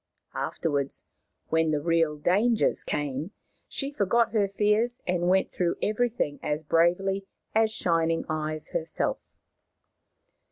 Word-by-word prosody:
Afterwards, 140 -4 0 0.4
when 160 0 +2
the 150 -1 +1
real 165 -1 +1
dangers 210 +9 +2
came, 145 +5 -3 0.3
she 275 0 -3
forgot 230 -1 +2
her 210 -3 +2
fears 210 +5 +1
and 175 -1 +1
went 190 +1 +2
through 175 -2 0
everything 215 -9 0
as 150 +1 -2
bravely 180 +5 +2 0.3
as 220 0 +4
Shining 165 -5 0
Eyes 155 0 -3
herself. - - -1
175 Hz, 115 wpm, -27 LUFS, 155-215 Hz, 0.4 s, as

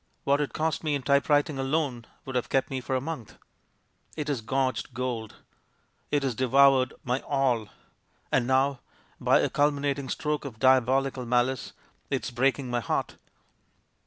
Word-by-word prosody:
What 140 +1 +2
it 145 - -2
cost 160 +1 -1
me 150 -2 +1
in 140 - -4
typewriting 145 +1 +2
alone 135 -4 -1 0.2
would 130 - -6
have 125 - -1
kept 135 0 +1
me 130 -1 -2
for 130 +2 -2
a - - +2
month. 135 -5 -7 0.8
It 150 -1 -3
has 135 -5 -1
gorged 130 +1 -1
gold. 120 -3 -3 0.7
It 145 -1 +1
has 135 -2 0
de 130 +3 -1
voured 135 0 +5
my 125 +1 0
All. 130 -6 0 0.6
And 120 -2 +2
now, 130 0 +2 0.4
by - - +4
a - - +1
culminating 145 -1 0
stroke 150 -1 -2
of 130 -6 -7
diabolical 130 +1 +2
malice, 125 +1 0 0.4
it's 130 -2 -2
breaking 130 +2 +1
my 120 - +1
heart." 115 - -2
135 Hz, 160 wpm, -27 LUFS, 125-140 Hz, 0.8 s, voured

